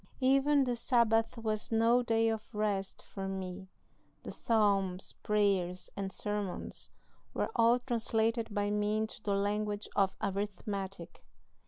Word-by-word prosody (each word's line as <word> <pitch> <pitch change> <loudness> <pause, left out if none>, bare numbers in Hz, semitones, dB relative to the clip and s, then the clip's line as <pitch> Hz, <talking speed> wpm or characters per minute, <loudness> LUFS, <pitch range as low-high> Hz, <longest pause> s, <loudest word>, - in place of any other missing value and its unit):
Even 275 +2 +4
the 245 -2 0
Sabbath 230 -1 +2
was 215 -1 -2
no 230 +2 +4
day 225 -1 +2
of 220 0 -4
rest 205 -2 -1
for 195 -1 -6
me 190 0 -5 0.6
the - - -6
psalms, 200 -5 +1
prayers, 195 -4 +1
and 195 -1 -3
sermons 205 -1 -4 0.5
were - - -1
all 230 +1 +5
translated 230 -2 0
by 205 0 0
me 210 +1 +1
into 220 0 -3
the 200 -1 0
language 205 +1 -1
of 195 -2 +2
arithmetic. 195 -2 -4
210 Hz, 130 wpm, -32 LUFS, 195-225 Hz, 0.6 s, all